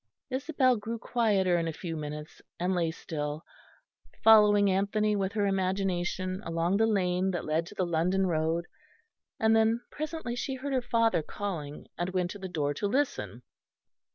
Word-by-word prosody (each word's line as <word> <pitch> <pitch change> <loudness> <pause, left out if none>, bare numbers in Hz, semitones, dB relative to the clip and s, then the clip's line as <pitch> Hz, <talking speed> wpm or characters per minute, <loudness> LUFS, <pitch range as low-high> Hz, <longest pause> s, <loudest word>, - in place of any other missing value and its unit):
Isabel 260 -2 +2
grew 225 +2 -4
quieter 200 -7 +2
in 165 - -1
a - - -1
few 165 +1 -5
minutes 150 0 -7 0.2
and 180 +2 0
lay 170 -2 +1
still, 150 -1 -5 0.8
following 210 -2 +7
Anthony 210 +2 +1
with 195 0 -1
her 210 -2 +1
imagination 185 -1 -1
along 165 +3 0
the 225 +1 +3
lane 185 -3 +1
that 175 -2 -3
led 160 +2 0
to 205 - -11
the 185 - 0
London 175 +3 +1
road, 165 0 0 0.7
and 220 0 +4
then 225 +1 +3
presently 310 -5 -4
she 265 +2 -3
heard 270 +2 -4
her 260 - +2
father 230 -6 +2
calling, 155 -5 -5
and 180 +2 -2
went 180 -1 0
to 205 - -8
the 190 -1 -6
door 145 -4 -1
to 205 +8 -2
listen. 275 +7 -1
190 Hz, 165 wpm, -29 LUFS, 170-220 Hz, 0.8 s, following